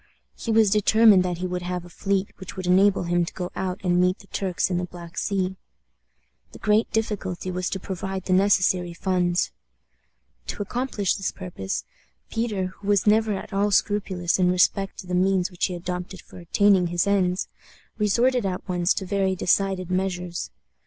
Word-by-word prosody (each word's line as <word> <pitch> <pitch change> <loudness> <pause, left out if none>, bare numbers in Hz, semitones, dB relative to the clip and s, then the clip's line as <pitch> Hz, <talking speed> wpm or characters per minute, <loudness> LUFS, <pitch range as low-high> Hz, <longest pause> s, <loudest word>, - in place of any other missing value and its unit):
He - - -7
was 220 -2 +4
determined 215 -1 +6
that 180 -1 -2
he 180 - -4
would 180 0 -3
have 180 0 -4
a - - -11
fleet 195 +2 -1
which 190 - -9
would 185 - -4
enable 190 +2 +4
him 175 0 +1
to 170 - -6
go 180 0 -5
out 185 0 -3
and 180 -1 +3
meet 180 +1 +2
the - - -16
Turks 190 -2 -1
in 175 - +1
the 180 - -2
Black 175 -1 -11
Sea. 190 -1 -1 1.0
The - - -10
great 215 +1 +2
difficulty 195 -5 -2
was 180 0 -2
to 190 - -3
provide 190 0 -4
the 185 - 0
necessary 185 -2 +2
funds. 180 -1 0 1.0
To 205 - -3
accomplish 225 -3 -1
this 195 - -2
purpose, 95 - -5 0.5
Peter, 205 -5 -2
who 200 - -9
was 205 -2 +3
never 215 0 +3
at 195 - -6
all 200 +1 +2
scrupulous 195 -4 +1
in 180 -1 +4
respect 195 +2 +1
to - - -14
the 180 - -5
means 185 +1 +2
which 180 - 0
he 180 - -3
adopted 180 +1 -5
for - - -13
attaining 185 +1 +3
his 175 0 0
ends, 190 -2 +1 0.5
resorted 240 +5 +2
at 185 -2 -3
once 175 0 +1
to 190 - -3
very 190 0 0
decided 185 0 +1
measures. 180 -2 -2
185 Hz, 180 wpm, -24 LUFS, 180-200 Hz, 1.0 s, determined